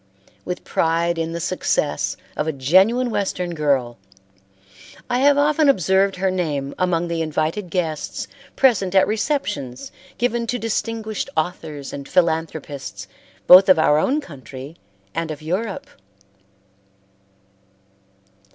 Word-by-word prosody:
With 180 - -4
pride 165 +1 0
in 165 0 -2
the 170 - -4
success, 170 - -1 0.2
of 150 - -2
a - - +1
genuine 190 - +3
Western 180 -4 -2
girl, 135 -7 0 1.1
I 245 - +2
have 285 +1 +5
often 295 +1 +3
observed 190 - +3
her 190 +1 0
name 145 -7 -2
among 175 -2 +1
the 170 -1 -2
invited 160 +4 -2
guests 160 -3 -3 0.3
present 200 -8 +2
at 190 - +6
receptions 205 - -2 0.3
given 240 -1 0
to 245 - -1
distinguished 225 -1 -3
authors 155 -4 -3
and 140 -1 -7
philanthropists 160 -5 -1 0.4
both 185 +2 +9
of 185 - +7
our 150 -1 +4
own 280 - +1
country 135 - -10 0.4
and 165 0 -3
of 155 0 -7
Europe. 195 +6 -3
175 Hz, 120 wpm, -21 LUFS, 155-210 Hz, 1.1 s, both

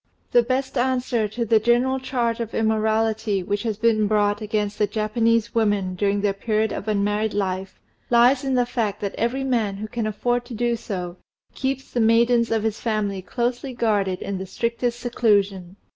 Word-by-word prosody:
The 240 - +6
best 260 +2 -1
answer 250 -3 0
to 235 +3 -3
the 225 0 +4
general 240 +4 +2
charge 240 -3 -1
of 230 -1 -4
immorality 220 -2 +1
which 205 +2 -2
has 220 -3 -2
been 220 -1 +2
brought 205 0 +1
against 210 -1 -2
the 210 - +3
Japanese 225 +2 +1
women 205 -5 +1
during 200 +2 0
their 200 -1 +1
period 215 +1 0
of 205 - -5
unmarried 210 +1 0
life, 190 -1 -3 0.3
lies 245 +3 +5
in 270 -1 0
the 245 -1 +3
fact 230 -5 -2
that 200 -1 -3
every 245 +4 -1
man 225 -7 0
who 215 +2 -5
can 225 0 -3
afford 240 +3 -1
to 240 -1 -8
do 240 +1 0
so 180 -5 -5 0.4
keeps 270 0 -3
the 245 - -1
maidens 235 +1 +4
of 225 -1 0
his 220 -1 -2
family 210 -4 -1
closely 245 +5 -3
guarded 205 -5 0
in 195 -2 -4
the 190 - -6
strictest 235 +4 -2
seclusion. 200 -6 +1
220 Hz, 180 wpm, -23 LUFS, 205-240 Hz, 0.4 s, The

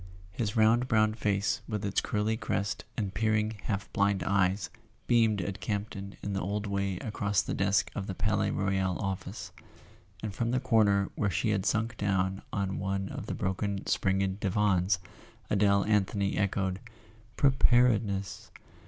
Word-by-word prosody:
His 105 +2 -2
round 115 +3 +4
brown 110 -2 +3
face 105 -2 0
with 105 -2 -2
its 100 - +1
curly 105 +1 0
crest 100 -2 -2
and 100 -4 -2
peer¬ 110 +1 +2
ing 105 +1 0
half 105 -2 -3
blind 100 -1 +2
eyes 95 0 +1 0.3
beamed 110 -4 +3
at 95 +2 -4
Campton 100 -2 -4
in 100 - -2
the 100 - -1
old 100 +3 -2
way 100 -2 -1
across 100 -2 0
the - - -3
desk 100 +1 +1
of 100 -1 -4
the 95 - -4
Palais 105 +1 +1
Royal 95 -2 0
office; 95 -2 -4 0.7
and 105 -2 -3
from 115 +4 -1
the 125 +1 +1
corner 110 -6 +3
where 100 - 0
she 95 +4 0
had 100 -1 0
sunk 115 +1 0
down 95 -1 0
on 100 -2 -2
one 95 0 -2
of - - -6
the - - -3
broken 95 +1 -2
springed 95 0 0
divans, 95 -2 +2 0.5
Adele 100 -1 +3
Anthony 100 -1 +1
echoed: 95 -1 0 0.6
"Preparedness!" 120 -7 +2
100 Hz, 155 wpm, -29 LUFS, 95-110 Hz, 0.7 s, round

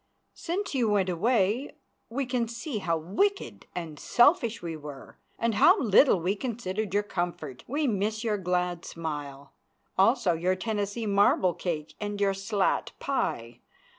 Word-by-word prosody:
Since 370 +2 -3
you 245 -5 +2
went 200 -3 +2
away 215 - +1 0.3
we 265 +4 -2
can 245 -2 -1
see 235 +1 -4
how 170 -4 0
wicked 300 - -1
and 160 -4 -6
selfish 240 -3 +3
we 165 -2 -5
were 145 -3 -10 0.2
and 230 -1 0
how 360 - +6
little 220 -2 +5
we 180 +4 0
considered 215 -3 -3
your 205 +2 +1
comfort. 170 -9 -4
We 295 +4 -1
miss 215 -1 -1
your 215 -3 0
glad 180 -1 -1
smile, 145 -4 -6 0.5
also 195 -3 +4
your 180 +3 0
Tennessee 205 +2 -2
marble 200 -3 +3
cake 160 -3 -4
and 205 -1 -4
your 200 -1 +2
slat 195 0 0
pie. 120 - -2
200 Hz, 145 wpm, -28 LUFS, 175-230 Hz, 0.5 s, how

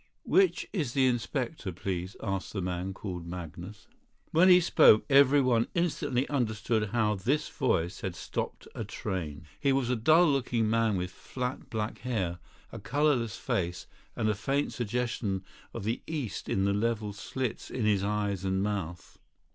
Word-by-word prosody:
"Which 380 -1 +3
is 150 - -1
the 135 -1 +3
inspector, 125 -1 -1
please?" 90 +1 -4
asked 95 -3 -3
the 100 - -2
man 90 +1 -2
called 90 -3 -6
Magnus. 90 +3 -8 0.4
When 180 +4 +6
he 180 0 +9
spoke 155 -10 +6
everyone 135 -4 +5
instantly 145 -6 0
understood 110 -5 0
how 110 -2 +2
this 120 +10 0
voice 85 +2 0
had - - -3
stopped - - -5
a - - -4
train. 80 -5 -5
He 140 - +2
was 135 -2 +1
a - - +2
dull 155 +10 +5
looking 125 -6 +1
man 115 -2 +2
with 90 0 -3
flat 125 +6 -5
black 110 -2 -3
hair, 95 -9 -2 0.3
a - - -7
colourless 130 -6 +1
face, 90 -1 -2 0.3
and 110 - 0
a 110 - +3
faint 135 +7 -1
suggestion 115 -4 -2 0.3
of 115 - -6
the 110 +4 -1
East 145 -10 -4
in 95 0 +1
the 100 - +2
level 105 0 -1
slits 120 +3 -4
in 120 -4 -2
his 100 -2 +2
eyes 100 -2 -1
and 95 0 0
mouth. 95 -5 -4
110 Hz, 160 wpm, -29 LUFS, 95-130 Hz, 0.4 s, he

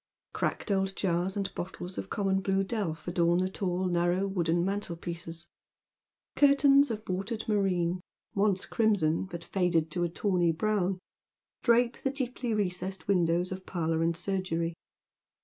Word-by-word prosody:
Cracked - - -2
old 195 0 +1
jars 180 +1 0
and 195 -1 -2
bottles 180 0 -6
of - - -5
common 195 -2 +1
blue 195 0 +1
delf 185 -7 -3
adorn 175 0 +2
the 185 +1 +1
tall 185 -1 -1
nan'ow 175 +2 +1
wooden 175 -3 +1
mantelpieces; 170 -3 -4 0.9
curtains 280 0 +6
of 215 -2 -5
watered 195 +5 -3
moreen, 185 -4 +1 0.3
once 200 -2 +1
crimson, 195 -8 +2
but 170 -3 -7
faded 170 -4 +1
to 175 +1 -1
a 170 - 0
tawny 175 -1 +1
brown, 195 +1 0 0.6
drape 235 0 +3
the 270 - +1
deeply 250 -3 -3
recessed 190 -2 -2
•windows 175 -1 +2
of 185 0 -6
parlour 165 -2 0
and 165 0 +1
surgery. 175 -3 -1
185 Hz, 140 wpm, -29 LUFS, 170-200 Hz, 0.9 s, curtains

